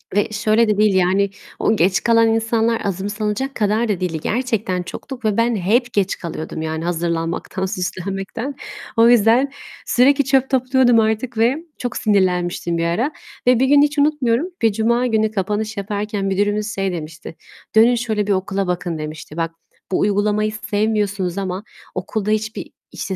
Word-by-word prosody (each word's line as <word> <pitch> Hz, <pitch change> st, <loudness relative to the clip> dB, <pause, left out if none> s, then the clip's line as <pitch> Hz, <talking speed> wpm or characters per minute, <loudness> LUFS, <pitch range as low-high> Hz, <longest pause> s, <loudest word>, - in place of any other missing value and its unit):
ve 205 Hz, -, +3 dB
şöyle 215 Hz, +2 st, +2 dB
de 210 Hz, -1 st, +1 dB
değil, 210 Hz, -2 st, +3 dB
yani, 190 Hz, +2 st, +2 dB, 0.3 s
o 220 Hz, -, +2 dB
geç 185 Hz, 0 st, +2 dB
kalan 230 Hz, -1 st, +4 dB
insanlar 225 Hz, 0 st, +1 dB
azımsanacak 210 Hz, +6 st, -2 dB
kadar 215 Hz, +2 st, +1 dB
da 195 Hz, -, 0 dB
değildi. 175 Hz, -4 st, -2 dB
Gerçekten 215 Hz, -6 st, -1 dB
çoktuk 255 Hz, +6 st, -8 dB
ve 210 Hz, -2 st, +1 dB
ben 230 Hz, 0 st, +2 dB
hep 230 Hz, +6 st, +1 dB
geç 195 Hz, -2 st, 0 dB
kalıyordum 160 Hz, -1 st, -6 dB
yani, 160 Hz, 0 st, -3 dB
hazırlanmaktan, 170 Hz, +2 st, -2 dB
süslenmekten. 195 Hz, +7 st, -4 dB, 0.4 s
O 230 Hz, +1 st, +6 dB
yüzden 240 Hz, +4 st, +4 dB, 0.3 s
sürekli 280 Hz, +3 st, +4 dB
çöp 270 Hz, 0 st, +2 dB
topluyordum 255 Hz, -2 st, +3 dB
artık 220 Hz, +2 st, -1 dB
ve 235 Hz, +5 st, +3 dB, 0.2 s
çok 245 Hz, -1 st, -4 dB
sinirlenmiştim 180 Hz, -4 st, +1 dB
bir 165 Hz, -, 0 dB
ara. 220 Hz, -, 0 dB, 0.4 s
Ve 250 Hz, -1 st, +5 dB
bir 265 Hz, -, +4 dB
gün 285 Hz, +1 st, +6 dB
hiç 295 Hz, +1 st, +1 dB
unutmuyorum, 285 Hz, -1 st, +2 dB
bir 225 Hz, -1 st, +4 dB
cuma 235 Hz, +4 st, +1 dB
günü 220 Hz, -2 st, +1 dB
kapanış 210 Hz, +2 st, -2 dB
yaparken 205 Hz, 0 st, -3 dB
müdürümüz 205 Hz, +2 st, 0 dB
şey 195 Hz, -1 st, -1 dB
demişti: 160 Hz, -1 st, -7 dB, 0.4 s
"Dönün 230 Hz, +3 st, +6 dB
şöyle 220 Hz, -4 st, -1 dB
bir 205 Hz, -, +1 dB
okula 195 Hz, 0 st, -1 dB
bakın" 175 Hz, -2 st, -2 dB
demişti. 155 Hz, 0 st, -7 dB
"Bak, 165 Hz, -1 st, -1 dB, 0.4 s
bu -, -, +1 dB
uygulamayı 210 Hz, +1 st, +1 dB, 0.2 s
sevmiyorsunuz 205 Hz, -3 st, 0 dB
ama 190 Hz, 0 st, -3 dB, 0.3 s
okulda 205 Hz, +3 st, -2 dB
hiçbir, 215 Hz, +1 st, -2 dB, 0.2 s
işte, 190 Hz, -, -4 dB
210 Hz, 160 wpm, -20 LUFS, 190-230 Hz, 0.4 s, O